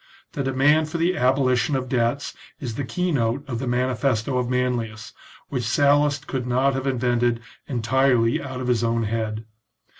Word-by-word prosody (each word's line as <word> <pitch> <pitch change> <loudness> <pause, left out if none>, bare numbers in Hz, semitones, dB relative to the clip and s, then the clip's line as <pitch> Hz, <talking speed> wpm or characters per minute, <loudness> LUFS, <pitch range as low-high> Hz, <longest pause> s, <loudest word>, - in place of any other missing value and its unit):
The 145 - -3
demand 140 +4 +3
for 170 - -3
the 170 +3 +1
abolition 130 0 +2
of 130 -1 -2
debts 125 +2 0 0.3
is 125 -5 -4
the 140 - -3
key 180 +9 -1
note 135 +1 0
of 120 -3 -3
the 130 - -3
manifesto 125 0 0
of 125 -1 -2
Manlius, 120 -3 -2 0.4
which 130 -3 -2
Sallust 145 +4 +2
could 130 -2 -3
not 130 +3 +2
have 135 +1 -3
invented 120 -2 +1 0.3
entirely 125 -1 +2
out 130 -2 -6
of 125 - -3
his 120 -2 +1
own 115 0 +1
head. 110 0 -3
125 Hz, 170 wpm, -23 LUFS, 115-135 Hz, 0.4 s, demand